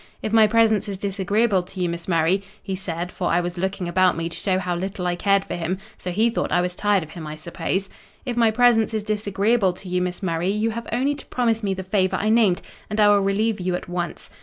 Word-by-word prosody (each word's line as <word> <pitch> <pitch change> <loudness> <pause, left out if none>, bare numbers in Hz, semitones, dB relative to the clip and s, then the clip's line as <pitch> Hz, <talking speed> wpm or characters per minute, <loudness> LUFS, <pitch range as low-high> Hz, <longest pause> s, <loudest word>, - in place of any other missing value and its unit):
If 215 - -2
my 220 -1 +7
presence 220 -1 +3
is 195 - -4
disagreeable 200 +1 +1
to 185 +2 -11
you, 180 - +1
Miss 170 0 -5
Murray,' 170 +2 +2 0.2
he 195 - -4
said 175 -1 -4
(for 180 - -3
I 170 - +3
was 175 0 -3
looking 190 0 -2
about 185 +1 +3
me 165 0 -2
to 165 - -8
show 190 -2 0
how 180 -2 -2
little 190 +1 -4
I 175 0 0
cared 200 +2 +2
for - - -5
him, 175 +2 -2 0.2
so 180 - -6
he 220 +6 +2
thought - - -2
I 175 - +3
was 180 0 -1
tired 205 -1 +1
of 155 - -12
him, 165 -3 -8
I 150 - -5
suppose)—'if 190 - -5
my 230 -2 +4
presence 225 -1 +3
is 215 - -1
disagreeable 210 -1 +1
to 185 - -12
you, 180 0 0
Miss 180 +2 -3
Murray, 170 0 0
you 215 +3 0
have 235 +1 -6
only 260 +5 +1
to 285 - -9
promise 230 -3 0
me 195 -3 -1
the 190 - -5
favour 190 0 +1
I 215 - 0
named, 215 -5 +3 0.3
and 210 - -2
I 210 -1 +6
will 205 -1 +5
relieve 205 +2 +1
you 180 0 -1
at - - -6
once. 175 -2 -4
195 Hz, 250 wpm, -23 LUFS, 180-215 Hz, 0.3 s, my